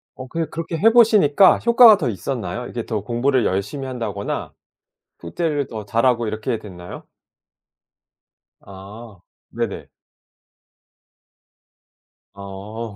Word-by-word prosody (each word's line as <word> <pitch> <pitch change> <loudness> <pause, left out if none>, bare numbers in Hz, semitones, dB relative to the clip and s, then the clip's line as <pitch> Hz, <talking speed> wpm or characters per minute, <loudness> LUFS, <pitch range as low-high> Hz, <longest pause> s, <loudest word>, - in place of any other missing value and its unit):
어 130 - -9
그게 165 +5 -3
그렇게 165 0 -5
해 225 +8 +4
보시니까 210 -7 +5
효과가 235 -2 +7
더 140 -9 -2
있었나요? 120 +3 -5
이게 115 -2 -6
더 110 -3 -3
공부를 120 +4 0
열심히 100 +9 -3
한다거나 110 -6 -5 0.7
숙제를 145 - -2
더 110 -3 -7
잘 115 +4 -1
하고 120 -2 +2
이렇게 110 +1 -3
됐나요? 90 -4 -11 1.6
아. 100 +2 -12 0.3
네네. - - -5 2.4
어. 100 +3 -8
120 Hz, 225 characters per minute, -20 LUFS, 105-145 Hz, 2.4 s, 효과가